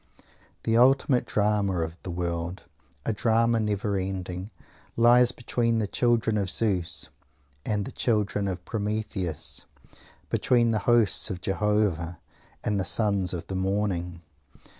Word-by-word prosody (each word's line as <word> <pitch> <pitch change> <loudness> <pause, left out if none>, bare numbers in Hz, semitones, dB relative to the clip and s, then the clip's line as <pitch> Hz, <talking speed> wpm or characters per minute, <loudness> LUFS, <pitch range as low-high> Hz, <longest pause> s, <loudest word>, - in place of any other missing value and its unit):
The 115 0 +2
ultimate 130 +1 +4
drama 100 -4 +1
of 80 0 -4
the - - -7
world, 85 +1 -3 0.4
a - - 0
drama 115 +2 +2
never 105 -1 -1
ending, 95 0 -4 0.5
lies 120 +1 +6
between 115 -1 -1
the 110 - +1
children 115 0 +1
of 95 -2 -1
Zeus 90 -7 -1 0.6
and 105 -2 0
the - - -6
children 105 -3 0
of 95 -1 -4
Prometheus; 105 -6 -3 0.6
between 120 -2 +3
the 110 - +1
hosts 120 -3 +4
of 95 -4 -4
Jehovah 95 -4 0 0.5
and 105 -2 0
the - - 0
Sons 95 0 +1
of 85 -2 -4
the 95 - -5
Morning. 95 -3 -2
105 Hz, 130 wpm, -26 LUFS, 90-115 Hz, 0.6 s, lies